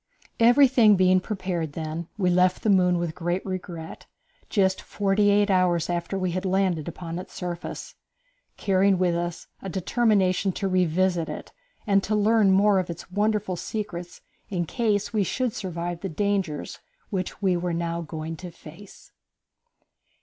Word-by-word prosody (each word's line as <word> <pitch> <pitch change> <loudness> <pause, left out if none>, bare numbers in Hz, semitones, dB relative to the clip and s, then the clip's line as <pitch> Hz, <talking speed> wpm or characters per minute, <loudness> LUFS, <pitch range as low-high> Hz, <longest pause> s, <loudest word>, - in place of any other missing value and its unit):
Everything 240 -2 +6
being 185 0 +4
prepared 180 -5 -3
then, 160 +1 -5
we 180 -3 +2
left 180 +1 +2
the 215 - +3
moon 180 -2 +4
with 170 -2 -2
great 175 +2 -2
regret, 175 -4 -6 0.4
just 190 -3 +1
forty 205 0 +1
eight 205 0 +3
hours 175 -2 +2
after 175 +3 -2
we 185 -2 -1
had 185 +2 -3
landed 185 -4 0
upon 170 0 -5
its 185 0 -10
surface, 175 -1 -6 0.6
carrying 195 -1 +3
with 180 -1 +2
us 175 0 -3 0.2
a 195 - -5
determination 195 0 +1
to 195 - -2
revisit 185 -1 +1
it - - -7 0.3
and 200 -1 +3
to 215 - 0
learn 210 0 +4
more 195 +1 +4
of 180 - -3
its 170 +1 -8
wonderful 205 -1 0
secrets 175 -3 -6 0.3
in 175 -3 -1
case 210 - -1
we 210 -2 +2
should 250 +4 -1
survive 175 -2 -4
the 195 - -3
dangers 190 -3 -2 0.3
which 185 -3 -3
we 190 -3 +2
were 175 +1 -2
now 170 0 -2
going 160 0 -6
to 180 +2 -8
face. 170 +4 -14
185 Hz, 155 wpm, -25 LUFS, 175-200 Hz, 0.6 s, Everything